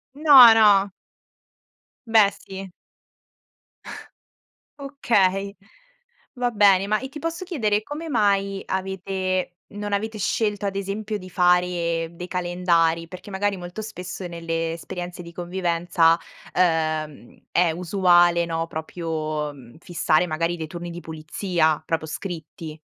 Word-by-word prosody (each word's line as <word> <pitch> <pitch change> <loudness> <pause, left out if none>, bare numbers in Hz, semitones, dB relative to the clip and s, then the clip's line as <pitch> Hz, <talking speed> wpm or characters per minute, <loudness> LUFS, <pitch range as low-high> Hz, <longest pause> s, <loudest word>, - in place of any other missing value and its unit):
No, 275 -6 +9
no. 205 -3 +5 1.2
Beh, 220 -3 +5
sì. 195 -1 -9 2.1
Okay, 200 -8 0 0.8
va 245 -1 -1
bene, 200 -2 +4
ma 215 +1 +1
e 265 - -6
ti 300 +3 -9
posso 330 +4 -4
chiedere 215 - 0
come 310 +4 -6
mai 200 -4 +1
avete 190 -1 -2 0.2
non 205 0 -6
avete 215 +2 -2
scelto 205 0 -1
ad 195 - -4
esempio 205 +2 -3
di 185 -1 -11
fare 175 -2 +1
dei 180 +1 -8
calendari? 175 -2 +1
Perché 185 +3 -11
magari 200 +1 -1
molto 180 +4 -7
spesso 185 -3 -7
nelle 165 -1 -3
esperienze 175 +1 -7
di 170 - -11
convivenza, 170 -2 +1 0.3
ehm, 155 -6 -1
è 175 -2 +3
usuale, 175 -1 +3
no, 165 0 -3
proprio, 155 -2 -4
mhmm, 125 -1 -15
fissare 175 0 +1
magari 165 +2 -1
dei 160 -1 -5
turni 175 +2 -7
di 175 - -7
pulizia 160 0 -1
proprio 160 -1 -2
scritti. 160 -2 -7
180 Hz, 120 wpm, -23 LUFS, 165-205 Hz, 2.1 s, No